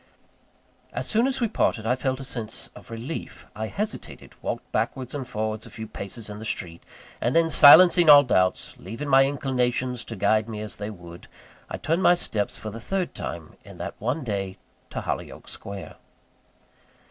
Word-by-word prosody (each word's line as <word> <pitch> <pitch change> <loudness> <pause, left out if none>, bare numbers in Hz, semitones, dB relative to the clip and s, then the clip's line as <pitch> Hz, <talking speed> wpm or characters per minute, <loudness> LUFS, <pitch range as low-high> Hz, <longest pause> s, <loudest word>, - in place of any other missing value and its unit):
As - - -3
soon 230 +3 +3
as 270 - 0
we 235 - +2
parted 115 - 0
I 125 +3 +2
felt 130 0 -2
a - - -6
sense 115 -2 -5
of - - -14
relief. 115 - -6
I 110 +1 -3
hesitated, 210 - -5
walked - - -4
backwards 130 -2 -2
and 135 -4 -4
forwards 110 -2 -3
a - - -11
few 110 -1 -7
paces 105 +2 -6
in 105 0 -7
the - - -8
street; 85 -6 -4 0.4
and 120 - 0
then, 165 -1 +4
silencing 170 +3 +8
all 145 -1 +10
doubts, 95 -8 +1
leaving 120 +6 -6
my 135 0 +7
inclinations 125 -3 -1
to 115 - -6
guide 110 +2 +2
me 110 -2 -5
as 105 -1 -6
they 105 +1 -4
would 85 -4 -11 0.4
I - - -4
turned 165 +3 0
my 180 - +6
steps 105 -11 -2
for 110 - -6
the 115 +2 -8
third 190 - -2
time - - -7
in - - -13
that - - -5
one 130 +8 -1
day 100 -4 -3 0.3
to - - -4
Hollyoake - - -5
Square. 100 -1 -7
120 Hz, 180 wpm, -25 LUFS, 105-145 Hz, 0.4 s, all